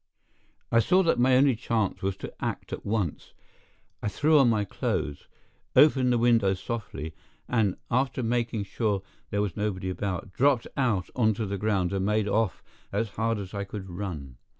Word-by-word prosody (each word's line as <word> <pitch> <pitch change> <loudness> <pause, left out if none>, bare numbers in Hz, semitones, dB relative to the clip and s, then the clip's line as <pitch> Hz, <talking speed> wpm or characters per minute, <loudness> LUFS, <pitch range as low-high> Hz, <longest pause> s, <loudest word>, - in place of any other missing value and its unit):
I 115 - +5
saw 185 +10 +4
that 165 - +2
my 130 +1 +5
only 135 -1 +4
chance 110 -3 -1
was 95 0 -1
to - - -7
act - - -3
at - - -5
once. 100 -7 -2 0.7
I - - -2
threw 150 +8 +4
on 130 -3 +5
my 105 -2 +1
clothes, 75 -6 -3 0.5
opened 130 -4 +6
the 120 - +3
window 115 -5 +3
softly, 95 -7 -5 0.3
and, 110 -6 +1
after 130 +1 +1
making 115 -2 0
sure 100 0 -1
that - - -34 0.2
there 100 0 0
was 100 - -3
nobody 95 -3 -2
about, 95 0 -4
dropped 135 -3 +3
out 115 -9 0
onto 110 -2 +2
the 100 -1 -3
ground 100 -3 +1
and 95 -1 0
made 105 +1 +1
off 105 -1 0 0.3
as 105 +2 -1
hard 115 +2 -1
as 100 -1 -7
I 100 -1 -2
could 95 -2 -7
run. 80 -9 -6
105 Hz, 175 wpm, -27 LUFS, 95-120 Hz, 0.7 s, opened